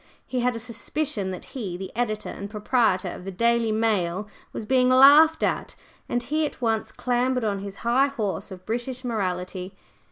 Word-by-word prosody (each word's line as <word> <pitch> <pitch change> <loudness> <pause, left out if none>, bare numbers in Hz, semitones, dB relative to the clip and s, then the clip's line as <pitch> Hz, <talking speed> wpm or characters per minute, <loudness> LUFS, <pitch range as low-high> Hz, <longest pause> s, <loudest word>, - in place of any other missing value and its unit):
He 255 - -2
had 245 0 +1
a - - -4
suspicion 230 -1 -3
that 185 - -6
he 200 -9 -4
the 190 +2 -8
editor 215 -3 -1
and 200 +1 -7
proprietor 210 -2 +1
of - - -8
the 195 - -5
Daily 230 +3 +2
Dial 210 -3 0 0.2
was 220 - -6
being 255 +2 +3
laughed 290 +5 +7
at, - - -1 0.3
and 240 0 0
he 310 +5 0
at 300 - -3
once 225 -3 0
clambered 250 0 0
on 205 -2 0
his 200 0 -7
high 255 +4 +4
horse 215 -8 -3
of 185 -2 -10
British 245 +3 -4
Morality. 185 -4 -3
230 Hz, 180 wpm, -25 LUFS, 200-250 Hz, 0.3 s, laughed